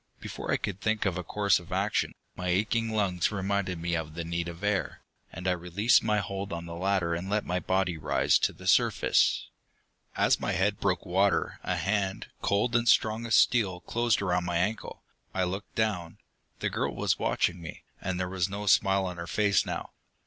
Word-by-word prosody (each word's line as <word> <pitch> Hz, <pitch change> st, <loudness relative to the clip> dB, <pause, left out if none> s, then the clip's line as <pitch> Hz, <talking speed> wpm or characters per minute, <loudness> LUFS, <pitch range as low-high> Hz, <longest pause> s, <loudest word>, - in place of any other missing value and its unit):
Before -, -, -5 dB
I -, -, +3 dB
could 100 Hz, -1 st, -5 dB
think 110 Hz, 0 st, 0 dB
of 95 Hz, -3 st, +1 dB
a 90 Hz, -, -3 dB
course 100 Hz, +2 st, +2 dB
of 85 Hz, -, -15 dB
action, -, -, 0 dB, 0.2 s
my 90 Hz, -, -4 dB
aching 110 Hz, +5 st, +1 dB
lungs 100 Hz, -5 st, 0 dB
reminded 95 Hz, -3 st, -1 dB
me 85 Hz, +1 st, -1 dB
of 80 Hz, -1 st, -4 dB
the 85 Hz, -, -3 dB
need 85 Hz, 0 st, -2 dB
of 85 Hz, +2 st, -8 dB
air, 105 Hz, -1 st, -1 dB, 0.3 s
and 95 Hz, -, -6 dB
I -, -, +4 dB
released 90 Hz, +6 st, +3 dB
my 105 Hz, -1 st, +1 dB
hold 100 Hz, 0 st, -3 dB
on 85 Hz, 0 st, -4 dB
the 85 Hz, -, -7 dB
ladder 90 Hz, -1 st, 0 dB
and 85 Hz, +3 st, -4 dB
let 105 Hz, +1 st, 0 dB
my 90 Hz, +1 st, -1 dB
body 95 Hz, -2 st, 0 dB
rise -, -, +2 dB
to -, -, +1 dB
the -, -, -14 dB
surface. -, -, +3 dB, 0.7 s
As -, -, +3 dB
my -, -, -1 dB
head -, -, +1 dB
broke -, -, 0 dB
the -, -, -12 dB
water, 95 Hz, +2 st, +1 dB
a 90 Hz, -, -1 dB
hand, 95 Hz, +2 st, -1 dB
cold 110 Hz, +5 st, +1 dB
and 120 Hz, 0 st, +3 dB
strong 110 Hz, +2 st, +3 dB
as 110 Hz, -, +3 dB
steel, 95 Hz, -7 st, +3 dB
closed 120 Hz, -1 st, 0 dB
around 90 Hz, -2 st, 0 dB
my 85 Hz, -1 st, 0 dB
ankle. 105 Hz, +5 st, -2 dB, 0.3 s
I 95 Hz, -, +1 dB
looked 95 Hz, +3 st, -4 dB
down. 100 Hz, -7 st, -1 dB, 0.4 s
The -, -, 0 dB
girl -, -, -2 dB
was -, -, 0 dB
watching 85 Hz, 0 st, 0 dB
me, 80 Hz, -, -9 dB, 0.2 s
and 95 Hz, -1 st, -2 dB
there 90 Hz, -, -1 dB
was 90 Hz, 0 st, -1 dB
no 100 Hz, +1 st, -5 dB
smile 95 Hz, -1 st, +3 dB
on 90 Hz, -1 st, -5 dB
her 85 Hz, 0 st, -6 dB
face 105 Hz, 0 st, +2 dB
now. -, -, -4 dB
95 Hz, 205 wpm, -28 LUFS, 90-105 Hz, 0.7 s, I